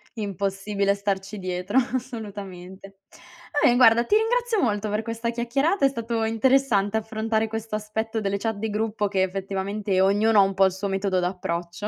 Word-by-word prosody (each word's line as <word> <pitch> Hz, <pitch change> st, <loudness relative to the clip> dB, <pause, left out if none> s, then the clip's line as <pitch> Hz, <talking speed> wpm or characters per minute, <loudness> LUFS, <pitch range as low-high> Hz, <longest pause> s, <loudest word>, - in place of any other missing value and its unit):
Impossibile 200 Hz, -1 st, -1 dB
starci 200 Hz, 0 st, -3 dB
dietro, 185 Hz, +4 st, -2 dB, 0.2 s
assolutamente. 195 Hz, -6 st, -7 dB, 0.6 s
Vabbè 240 Hz, -, +5 dB
guarda, 235 Hz, -1 st, +6 dB
ti 420 Hz, -, +2 dB
ringrazio 460 Hz, 0 st, +1 dB
molto 210 Hz, -3 st, 0 dB
per 210 Hz, +1 st, -1 dB
questa 230 Hz, 0 st, -3 dB
chiacchierata, 275 Hz, +8 st, +1 dB
è -, -, +5 dB
stato 230 Hz, -3 st, -3 dB
interessante 225 Hz, -3 st, +2 dB
affrontare 220 Hz, 0 st, -1 dB
questo 225 Hz, 0 st, -4 dB
aspetto 220 Hz, +1 st, -3 dB
delle 200 Hz, 0 st, -1 dB
chat 225 Hz, +1 st, -2 dB
di 220 Hz, +1 st, -3 dB
gruppo 210 Hz, 0 st, -1 dB
che 195 Hz, -1 st, 0 dB
effettivamente 195 Hz, +1 st, -1 dB
ognuno 205 Hz, +2 st, +4 dB
ha -, -, +9 dB
un 195 Hz, 0 st, 0 dB
po' 195 Hz, 0 st, +5 dB
il 190 Hz, -, +2 dB
suo 190 Hz, +2 st, -4 dB
metodo 195 Hz, -1 st, 0 dB
d'approccio. 175 Hz, +1 st, -3 dB
210 Hz, 160 wpm, -24 LUFS, 195-225 Hz, 0.6 s, ha